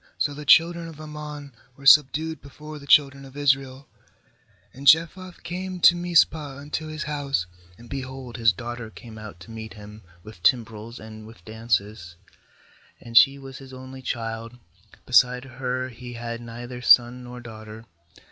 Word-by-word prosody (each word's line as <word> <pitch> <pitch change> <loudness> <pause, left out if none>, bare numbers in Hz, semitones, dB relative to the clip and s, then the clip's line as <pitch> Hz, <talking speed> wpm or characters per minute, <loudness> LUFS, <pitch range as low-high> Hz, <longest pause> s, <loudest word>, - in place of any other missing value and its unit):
So 145 - 0
the 150 +1 -9
children 170 +2 +5
of 160 -2 -11
Ammon 150 -2 -8 0.3
were 140 - -14
subdued 155 +3 +5
before 150 +2 -10
the 140 - -14
children 140 -1 +4
of 135 +1 -13
Israel. 135 -2 0 0.9
34And 135 +2 -11
Jephthah 170 +4 +4
came 180 +2 -5
to 175 - +8
Mizpah 160 -5 +2
unto 150 +2 -5
his 155 0 -5
house, 140 -10 -2 0.3
and, 120 - -14
behold, 130 -1 -7
his 115 -1 +4
daughter 120 -2 -7
came 110 0 -12
out 105 -6 -10
to 90 - -12
meet 110 0 -8
him 105 0 -12 0.2
with 105 -5 -13
timbrels 110 +2 0
and 110 0 -11
with 115 - -16
dances; 110 -5 -2 0.8
and 115 0 -12
she 135 +3 +7
was 135 -1 -10
his 135 -1 -13
only 130 +1 -10
child* 115 -1 -5 0.5
beside 125 0 +4
her 130 0 -3
he 120 0 -10
had 115 0 -6
neither 120 +1 -8
son 125 0 +5
nor 125 0 -9
daughter. 110 -1 -11
130 Hz, 155 wpm, -24 LUFS, 115-145 Hz, 0.9 s, to